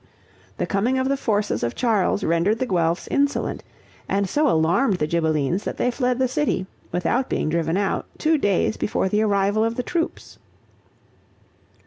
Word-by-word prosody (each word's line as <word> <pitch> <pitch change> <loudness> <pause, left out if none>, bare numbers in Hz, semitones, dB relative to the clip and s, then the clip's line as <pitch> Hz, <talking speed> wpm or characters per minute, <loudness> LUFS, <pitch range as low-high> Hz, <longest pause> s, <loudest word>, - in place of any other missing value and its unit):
The - - -1
coming 230 +7 0
of 260 +1 0
the 275 - +2
forces 210 -6 -1
of 120 - -2
Charles 215 -5 +1
rendered 170 +7 +2
the 255 - -1
Guelphs 170 -5 0
insolent, 285 0 0 0.5
and 200 0 +1
so 295 +7 +2
alarmed 175 +5 +2
the 150 - 0
Ghibellines 160 +2 0
that - - -4
they 250 - +1
fled 250 0 0
the 260 0 +2
city, 255 -7 -1 0.3
without 235 +9 0
being - - -1
driven 165 +2 0
out, 200 -1 -1
two 315 -1 +2
days 205 -2 +1
before 190 - -1
the 210 +2 +1
arrival 205 0 +2
of 230 +1 0
the 250 - -2
troops. 330 +3 -4
205 Hz, 165 wpm, -23 LUFS, 175-250 Hz, 0.5 s, the